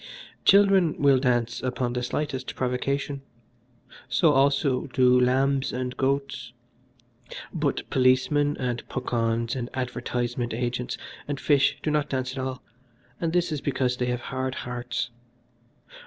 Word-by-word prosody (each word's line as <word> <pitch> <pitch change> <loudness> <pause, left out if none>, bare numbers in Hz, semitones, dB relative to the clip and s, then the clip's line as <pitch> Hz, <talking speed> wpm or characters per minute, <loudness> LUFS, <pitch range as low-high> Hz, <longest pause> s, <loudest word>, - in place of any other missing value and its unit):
"Children 195 -5 +5
will 140 -2 +5
dance 120 -3 0
upon 125 -1 -1
the 125 - -1
slightest 130 +1 -3
provocation, 140 +2 -1 0.9
so 165 -4 +4
also 140 -1 +2
do 125 -1 +4
lambs 135 +2 +2
and 125 0 -3
goats; 135 -2 -1 1.0
but 150 -4 -1
policemen, 130 +3 +3
and 120 -2 -2
puckauns, 115 0 -1
and 120 -2 -4
advertisement 120 -2 -2
agents, 125 +1 -2 0.3
and 145 -2 -3
fish 145 -3 +3
do 155 - 0
not 150 -1 0
dance 130 -1 -2
at 135 - -6
all, 130 -1 -4 0.6
and 165 -1 -1
this 175 -1 +1
is 150 -3 -2
because 130 -3 0
they 125 - -1
have 125 -1 -1
hard 130 0 -3
hearts. 120 0 -4
130 Hz, 130 wpm, -26 LUFS, 125-140 Hz, 1.0 s, Children